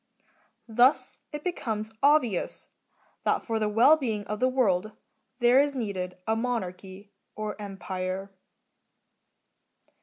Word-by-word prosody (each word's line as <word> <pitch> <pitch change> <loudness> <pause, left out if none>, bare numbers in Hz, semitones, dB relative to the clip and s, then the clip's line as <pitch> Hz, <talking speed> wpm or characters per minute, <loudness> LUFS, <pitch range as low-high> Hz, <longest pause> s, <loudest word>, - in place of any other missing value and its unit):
Thus 245 +5 +3
it 295 -1 -6
becomes 220 -11 -3
obvious 280 - +2 0.5
that - - +1
for 225 -2 -1
the 215 -1 0
well 235 +9 +6
being 220 -8 -2
of 210 0 -4
the 255 - +3
world 215 -6 +1 0.4
there 240 +1 +5
is 285 -1 -1
needed 185 -6 -3
a 220 - +1
Monarchy, 200 -4 -4 0.2
or 215 0 -4
Empire. 190 -1 -5
215 Hz, 115 wpm, -27 LUFS, 195-250 Hz, 0.5 s, well